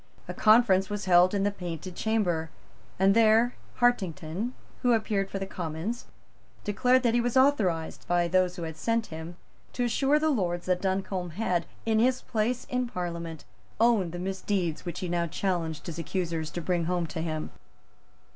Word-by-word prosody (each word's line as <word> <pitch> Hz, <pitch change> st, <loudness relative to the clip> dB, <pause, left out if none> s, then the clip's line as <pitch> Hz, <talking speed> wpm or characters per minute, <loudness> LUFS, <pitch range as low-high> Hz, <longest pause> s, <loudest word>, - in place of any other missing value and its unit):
A -, -, -4 dB
conference 215 Hz, -4 st, +4 dB
was 205 Hz, -1 st, -3 dB
held 180 Hz, +1 st, +5 dB
in 195 Hz, -, +1 dB
the 205 Hz, -, +2 dB
Painted 180 Hz, -2 st, -6 dB
Chamber; 180 Hz, -8 st, 0 dB, 0.5 s
and 195 Hz, +1 st, +4 dB
there 230 Hz, +2 st, +5 dB, 0.3 s
Hartington, 195 Hz, -2 st, 0 dB, 0.3 s
who 245 Hz, -1 st, +4 dB
appeared 210 Hz, -3 st, 0 dB
for -, -, -4 dB
the 195 Hz, -, -3 dB
Commons, 175 Hz, +5 st, -4 dB, 0.6 s
declared 250 Hz, +5 st, +3 dB
that 235 Hz, -2 st, +3 dB
he 240 Hz, -, +3 dB
was 245 Hz, +2 st, 0 dB
authorized, 200 Hz, -, +2 dB
by 175 Hz, 0 st, +2 dB
those 180 Hz, 0 st, +2 dB
who 175 Hz, -, -5 dB
had 160 Hz, -1 st, -6 dB
sent 230 Hz, +5 st, 0 dB
him, 160 Hz, +2 st, -7 dB, 0.4 s
to 245 Hz, -, -1 dB
assure 270 Hz, +5 st, +2 dB
the 310 Hz, +1 st, +2 dB
Lords 175 Hz, -8 st, -1 dB
that 180 Hz, -1 st, +1 dB
Duncombe 190 Hz, -2 st, -2 dB
had, 180 Hz, -6 st, 0 dB, 0.2 s
in 220 Hz, -1 st, +2 dB
his 255 Hz, +2 st, +2 dB
place 230 Hz, +2 st, -1 dB
in 250 Hz, 0 st, -1 dB
Parliament, 170 Hz, -5 st, -5 dB, 0.3 s
owned 220 Hz, -7 st, +3 dB
the 175 Hz, -, -6 dB
misdeeds 185 Hz, -2 st, -2 dB
which 175 Hz, +1 st, -4 dB
he 185 Hz, -, -2 dB
now 170 Hz, 0 st, 0 dB
challenged 170 Hz, -3 st, -2 dB
his 170 Hz, -1 st, -5 dB
accusers 165 Hz, -2 st, -2 dB
to 175 Hz, -, -5 dB
bring 170 Hz, 0 st, 0 dB
home 175 Hz, 0 st, 0 dB
to 160 Hz, 0 st, -5 dB
him. 155 Hz, -1 st, -3 dB
190 Hz, 175 wpm, -28 LUFS, 170-225 Hz, 0.6 s, held